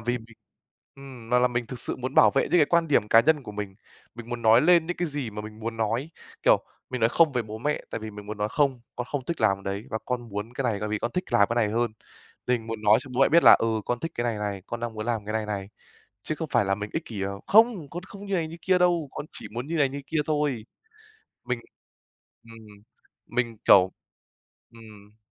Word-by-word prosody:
vì 120 +2 -1
mình, 110 -1 -16 0.6
ừm, 130 -4 -12
mà 125 - +5
là 125 0 +4
mình 120 -1 -2
thực 125 - -7
sự - - -4
muốn 130 +1 -5
bảo - - +7
vệ 135 - +2
những 180 - +2
cái 155 - +6
quan 170 0 +2
điểm 105 -7 +2
cá 115 - +7
nhân 150 +3 +2
của 105 - -8
mình. 100 -2 -5 0.4
Mình 120 0 -10
muốn 120 -1 -4
nói 115 +1 +6
lên 170 +1 +5
những 175 - -3
cái 175 - -1
gì 140 -5 -4
mà 105 0 -6
mình 105 +1 -10
muốn 115 +1 -4
nói, 115 +7 -1 0.3
kiểu, - - +4 0.3
mình 130 -1 -3
nói 115 - +4
không 160 0 +4
về 125 -2 0
bố 110 0 -8
mẹ, 150 +6 -1
tại - - -3
vì 110 0 -6
mình 105 -1 -10
muốn 105 0 -6
nói 105 0 0
không, 135 0 +1 0.2
"Con 125 0 -3
không 140 -3 -3
thích 170 +4 -4
làm 100 -3 +2
đấy 100 +2 -4
và 110 - -2
con 120 -2 -3
muốn 105 +3 -5
cái 135 - -3
này, 115 -4 +1
tại 105 - -2
vì 105 0 -1
con 120 - -2
thích 180 - -1
làm 100 - +5
cái 115 - -1
này 115 -3 +3
hơn." 115 +1 0 0.5
Tình 120 -3 0
muốn 115 -1 -5
nói 105 +1 +6
cho 130 - -12
bố 130 - 0
mẹ 135 - +6
biết 170 +1 +5
là - - +11
"Ừ, - - 0 0.2
con 120 - -1
thích 165 - -4
cái 120 - -2
này 115 -3 -1
này, 100 -2 -3
con 120 - -5
đang 120 -1 -4
muốn 110 0 -5
làm 115 -3 -1
cái 105 - -3
này 110 -1 -1
này." 100 -2 -4 0.5
Chứ 155 - -3
không 160 0 -5
phải - - +4
là 95 0 +1
mình 105 +1 -6
ích 160 - -3
kỷ: 105 -4 -6 0.2
"Không! 220 - +4
Con 175 +1 -6
không 200 +2 -11
như 200 - -2
này 170 -3 0
như 165 - -9
kia 185 -1 +3
đâu, 175 -4 +2
con - - -6
chỉ - - -8
muốn 120 +3 -4
như 165 - -3
này 145 -3 +3
như 140 +1 -6
kia 160 +3 -1
thôi." 145 -7 -1 0.8
Mình 125 -1 -1 0.8
ừm, 115 0 -13 0.7
mình, 120 -2 -2
kiểu 95 -1 +7 0.8
ừm. 105 -2 -15
120 Hz, 260 wpm, -26 LUFS, 110-145 Hz, 0.8 s, là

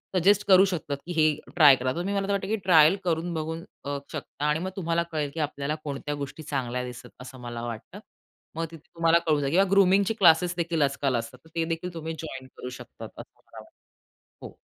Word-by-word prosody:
Suggest 200 +3 +4
करू 190 0 +7
शकतात 150 -6 -3
की 175 - -6
हे 155 -1 +4 0.2
ट्राय 150 -5 +8
करा 130 0 -1
तुम्ही. 180 +4 -2
मला 195 0 -1
तर - - -1
वाटतं 195 -1 -1
की 220 - +1
ट्रायल 160 0 +6
करून 170 0 -1
बघू 160 0 -3 0.3
अ, 140 0 -2
शकता 145 - -5
आणि 150 +1 +2
मग 185 - -3
तुम्हाला 170 -2 0
कळेल 150 -2 -1
की 165 - -6
आपल्याला 145 0 -2
कोणत्या 145 0 -4
गोष्टी 145 +2 -7
चांगल्या 125 -4 -3
दिसत, 125 -1 -9
असं 130 0 -10
मला 120 -1 -6
वाटतं. 115 -2 -7 0.6
मग 165 0 -2
तिथे 165 - -11 0.2
तुम्हाला 165 0 +4
कळून 150 -2 +3
जाईल 140 0 -1
किंवा 190 +3 +3
ग्रूमिंगची 195 +2 +4
क्लासेस 175 -3 +4
देखील 170 -2 -1
आजकाल 140 -2 +1
असतात. 115 -1 -4
तर 160 - -19
ते 165 -1 +1
देखील 165 +2 -4
तुम्ही 165 0 -5
जॉइन 135 -5 -7
करू 125 - -6
शकतात 125 - -10
असं - - -10
मला - - -15
वाटतं. - - -24 0.5
हो. - - -10
160 Hz, 210 wpm, -26 LUFS, 140-175 Hz, 0.6 s, ट्राय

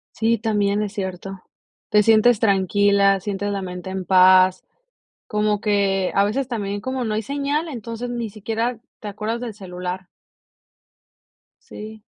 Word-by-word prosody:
Sí, 230 +1 +1
también 205 -2 0
es 210 -2 -3
cierto, 190 -1 -5 0.5
te 210 -1 +4
sientes 225 +1 +5
tranquila, 200 -1 +3
sientes 205 0 -3
la 200 -1 -2
mente 180 0 -6
en 190 0 -4
paz, 185 0 +5 0.7
como 210 -1 0
que 200 -3 +1
a 200 - +4
veces 260 +6 -1
también 205 -4 -3
como 260 +3 -3
no 220 - -2
hay 220 - -1
señal, 285 +5 -2
entonces 235 -3 -6
ni 235 -2 -4
siquiera 225 +3 -3 0.2
te 210 - -6
acuerdas 215 +3 -4
del 240 -2 -4
celular. 180 -1 -6 1.6
Sí. 215 +1 -10
210 Hz, 145 wpm, -22 LUFS, 195-225 Hz, 1.6 s, sientes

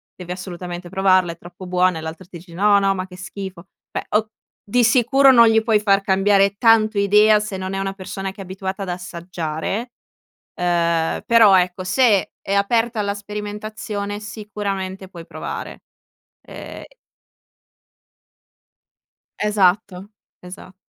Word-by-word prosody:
devi 180 -1 -9
assolutamente 180 -1 -7
provarla, 185 -2 +2
è - - -19
troppo 180 +2 -12
buona”, 180 -2 +1
e - - -7
l'altro 160 +3 -8
ti 175 0 -11
dice: 170 0 -15
“No, 200 +3 +4
no, 195 0 +2
ma 185 0 -4
che 180 - -13
schifo”, 190 -2 -8 0.3
beh - - -4
o 215 +1 +1 0.4
di 245 +4 +2
sicuro 265 +4 +5
non 235 -2 +7
gli 225 0 +4
puoi 220 -2 +3
far 200 -1 +2
cambiare 195 +1 +2
tanto 220 -2 +4
idea 210 +2 +5
se 210 -1 -5
non 190 +1 -5
è - - -2
una 195 0 -3
persona 195 0 -6
che 195 - -11
è - - -5
abituata 190 +1 -6
ad 190 - -6
assaggiare, 175 +4 -5 0.6
ehm, 170 -2 0
però 225 -4 +6
ecco, 180 +1 0
se 210 -1 +2
è 195 - -3
aperta 225 +3 +1
alla 200 -1 -1
sperimentazione, 210 0 -6
sicuramente 200 -3 -5
puoi 170 -3 -11
provare. - - -7 0.6
Ehm - - -9 2.5
Esatto, 200 -1 +1 0.3
esatto. 185 +1 -12
195 Hz, 145 wpm, -20 LUFS, 180-210 Hz, 2.5 s, non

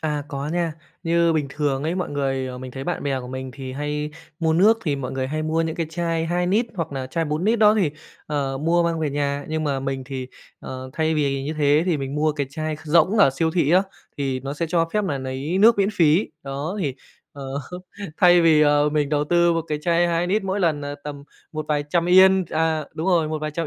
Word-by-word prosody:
À, 150 -2 -2
có 140 +1 -4
nha. 170 -1 -1 0.3
Như 170 -1 +2
bình 150 -3 0
thường 140 -1 -1
ấy, 165 +3 -1
mọi 180 -4 -3
người 135 -3 -2
mình 130 0 -7
thấy 135 +1 -7
bạn 175 - -3
bè 135 -2 -1
của 125 - -8
mình 130 0 -6
thì 130 -2 -7
hay 150 +2 -3 0.3
mua 160 -1 +2
nước 210 +7 +5
thì 145 -4 0
mọi 130 -2 -5
người 130 0 -2
hay 155 +3 -3
mua 160 +1 0
những 160 -1 -2
cái 165 - -1
chai 165 -1 -1
2 175 +1 0
nít 215 +6 +2
hoặc 165 -5 -3
là 130 -1 -4
chai 165 +5 -2
4 155 +4 -2
nít 225 +1 +2
đó 210 0 +6
thì, 185 -9 +2 0.4
ờ, 140 -3 -2
mua 170 +3 +2
mang 170 -1 -1
về 150 -3 0
nhà. 140 0 -1
Nhưng 155 0 -2
mà 140 -2 -1
mình 135 -1 -3
thì, 130 -1 -5 0.3
ờ, 130 0 -7
thay 160 0 0
vì 140 -3 0
như 150 - -3
thế 145 +1 +4
thì 175 -4 +2
mình 135 -1 -4
mua 155 +1 +1
cái 145 -2 -2
chai 155 +1 -3
kh 155 - -16
rỗng 170 +7 +3
ở 195 -9 +6
siêu 160 +4 0
thị 160 -3 +1
á, 185 +2 +5 0.3
thì 135 -2 -2
nó 135 +2 -5
sẽ 165 +2 -2
cho 165 0 +1
phép 210 -1 +1
nà 145 -7 -2
lấy 135 +7 -3
nước 225 +2 +6
miễn 200 0 +3
phí. 165 +3 +3
Đó, 140 +7 -4
thì, 140 -6 -1 0.4
ờ, 140 -1 -9 0.7
thay 175 -2 +6
vì, 160 -2 +5
à, 145 0 +4
mình 150 -2 +1
đầu 145 0 +1
tư 170 +2 +3
một 165 -1 0
cái 150 - -1
chai 170 +1 +2
2 170 +1 0
nít 195 +3 0
mỗi 195 +1 -1
lần 160 -5 +1
là 145 0 -5
tầm 145 -1 -7 0.3
một 155 0 -4
vài 145 -1 0
trăm 170 +1 +1
Yên 190 +1 +6
à, 160 -1 0
đúng 160 +3 -3
rồi, 170 -4 +3
một 155 0 -2
vài 155 0 -3
trăm 165 +1 -3
155 Hz, 250 wpm, -23 LUFS, 140-170 Hz, 0.7 s, đó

